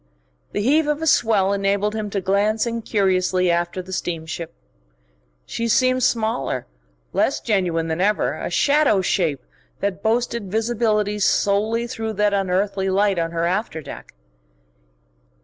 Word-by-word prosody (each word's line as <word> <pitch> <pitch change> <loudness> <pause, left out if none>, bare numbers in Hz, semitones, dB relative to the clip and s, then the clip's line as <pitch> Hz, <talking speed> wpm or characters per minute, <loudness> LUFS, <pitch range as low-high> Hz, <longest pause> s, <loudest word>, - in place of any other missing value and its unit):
The 205 - -2
heave 295 +6 +3
of 300 0 0
a - - 0
swell 210 -9 +3
enabled 200 +1 0
him 215 -1 -3
to 195 -1 -2
glance 205 +4 +1
incuriously 190 -6 +1
after 175 +2 -1
the 190 +1 -9
steamship. 165 -2 -4 0.9
She 230 - -3
seemed 255 +2 +3
smaller, 220 - 0 0.5
less - - +1
genuine 175 -6 0
than 160 +2 -2
ever, 210 +2 +1
a - - -5
shadow 285 -8 +3
shape 160 -8 0 0.4
that 200 -1 -2
boasted 230 -1 -1
visibility 215 -2 0
solely 210 +4 +1
through 225 -2 -4
that 210 0 +1
unearthly 195 0 0
light 195 -1 +2
on 165 0 -1
her 165 0 -1
after 185 -1 -1
deck. 150 - -10
200 Hz, 135 wpm, -22 LUFS, 185-225 Hz, 0.9 s, heave